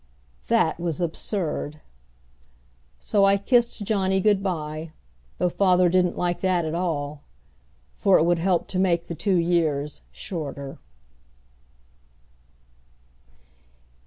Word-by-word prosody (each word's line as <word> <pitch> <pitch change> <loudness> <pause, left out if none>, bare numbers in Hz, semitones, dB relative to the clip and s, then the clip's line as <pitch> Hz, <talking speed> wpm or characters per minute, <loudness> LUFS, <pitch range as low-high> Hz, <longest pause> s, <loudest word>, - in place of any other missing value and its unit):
That - - +2
was 170 -2 -2
absurd! 165 -3 -3 1.2
So 200 - +1
I 195 0 +5
kissed 235 0 +1
Johnny 190 -2 +1
good 205 0 +3
by 155 -4 -4 0.4
though 180 - +1
father 180 0 +3
didn't 180 0 +2
like 175 -1 -1
that 185 -3 +1
at 155 - -3
all 150 -4 -2 0.7
for 195 -2 +4
it 160 - +3
would 175 0 +2
help 180 0 +1
to 185 - -2
make 175 -3 +2
the - - -4
two 190 +4 0
years 160 -4 0
shorter. 140 -7 -6
175 Hz, 110 wpm, -24 LUFS, 160-190 Hz, 1.2 s, I